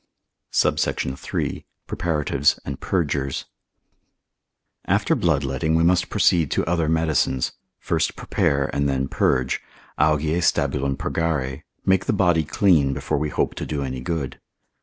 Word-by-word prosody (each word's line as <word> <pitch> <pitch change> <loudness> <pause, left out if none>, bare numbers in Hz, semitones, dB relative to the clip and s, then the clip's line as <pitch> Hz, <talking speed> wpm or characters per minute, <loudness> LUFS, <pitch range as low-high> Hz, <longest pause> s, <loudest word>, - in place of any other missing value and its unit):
SUBSECT. - - +1
III.—Preparatives 75 0 -1
and 70 -1 -5
Purgers. 70 -7 -1 1.4
After - - +2
bloodletting 75 -1 +1
we 80 - +3
must 90 +1 +3
proceed 80 -5 +3
to - - 0
other 85 -1 0
medicines; 80 -5 +1 0.3
first - - -1
prepare, 70 -1 0
and 70 0 +1
then 65 0 0
purge, 65 -1 +1 0.4
Augeae 75 +2 +2
stabulum 70 -4 +1
purgare, 70 -4 -2 0.2
make 95 -1 +3
the - - +1
body 90 -5 +3
clean 75 -3 +3
before 70 - -1
we 75 0 -1
hope - - 0
to - - -5
do 75 -2 -2
any 65 -1 -4
good. 75 0 -3
75 Hz, 125 wpm, -23 LUFS, 70-80 Hz, 1.4 s, we